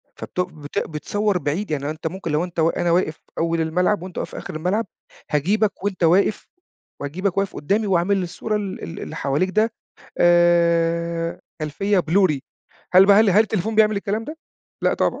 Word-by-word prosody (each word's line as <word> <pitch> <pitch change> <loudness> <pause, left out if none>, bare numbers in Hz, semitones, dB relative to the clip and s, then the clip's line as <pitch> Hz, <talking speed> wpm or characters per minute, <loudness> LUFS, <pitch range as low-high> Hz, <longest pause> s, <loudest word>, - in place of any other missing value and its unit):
فبت - - -7
بت 160 -1 -4
بتصوّر 205 +6 -1
بعيد، 170 +4 -2
يعني 145 -1 -2
أنت 155 +1 -4
ممكن 170 -1 -5
لو 150 +3 +1
أنت 175 -2 -6
وا 160 +1 +1
أنا 175 -1 +1
واقف 170 -2 +1 0.2
أول 165 0 0
الملعب 180 +4 +1
وأنت 185 -1 -9
واقف - - -3
في - - -8
آخر - - -7
الملعب، 185 +7 -1 0.4
هاجيبك 195 +7 +1
وأنت 200 -3 -2
واقف 185 +6 +3 0.5
واجيبك 180 +7 -2
واقف 195 -1 -1
قدّامي 205 +8 0
واعمل 190 +1 +2
السور 215 +5 -3
ال 200 -2 -5
ال 165 - -7
اللي - - -7
حواليك 145 +6 0
ده 215 +4 +1 0.5
آآ، 170 -1 +2 0.2
خلفية 195 +7 0
blurry، 170 -2 +2 0.6
هل 190 +1 +8
بقى 200 +1 +7
هل 220 -2 +4
هل 205 +4 +6
التليفون 220 0 -2
بيعمل 215 -1 +4
الكلام 210 +2 -2
ده؟ 305 +5 -7 0.5
لأ - - +2
طبعًا، - - 0
180 Hz, 180 wpm, -22 LUFS, 165-200 Hz, 0.6 s, هل